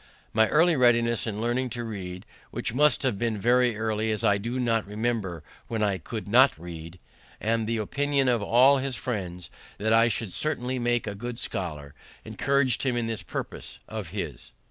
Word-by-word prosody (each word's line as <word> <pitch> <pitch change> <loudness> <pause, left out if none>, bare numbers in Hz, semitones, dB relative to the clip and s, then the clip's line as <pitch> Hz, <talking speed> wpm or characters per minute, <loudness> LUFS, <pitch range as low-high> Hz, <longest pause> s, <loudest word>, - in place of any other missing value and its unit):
My 110 0 +4
early 165 +2 +4
readiness 120 -3 +3
in 105 -1 -3
learning 120 +3 0
to 120 - -3
read 95 -4 -6 0.2
(which - - -3
must 150 +1 +4
have 120 -7 0
been 115 -2 0
very 120 +1 +3
early, 110 0 -1
as 110 -2 -1
I 100 -1 +3
do 120 +5 -3
not 115 -4 +1
remember 105 -6 -2 0.2
when 115 -2 -1
I 100 -2 +1
could 110 +5 -6
not 125 - +5
read), 85 +1 -9 0.4
and 115 0 0
the 115 0 0
opinion 140 +5 0
of 120 -3 +2
all 130 +6 +5
his 135 -1 -2
friends, 95 -8 -5 0.3
that 110 +2 +1
I 115 +1 +6
should 110 -3 -2
certainly 130 -4 -1
make 120 0 0
a 105 - -3
good 120 +3 -6
scholar, 75 - -4 0.3
encouraged 140 -3 +1
him 125 -3 0
in 120 - 0
this 115 -2 -3
purpose - - -6
of - - -5
his. - - -6
115 Hz, 185 wpm, -26 LUFS, 105-125 Hz, 0.4 s, I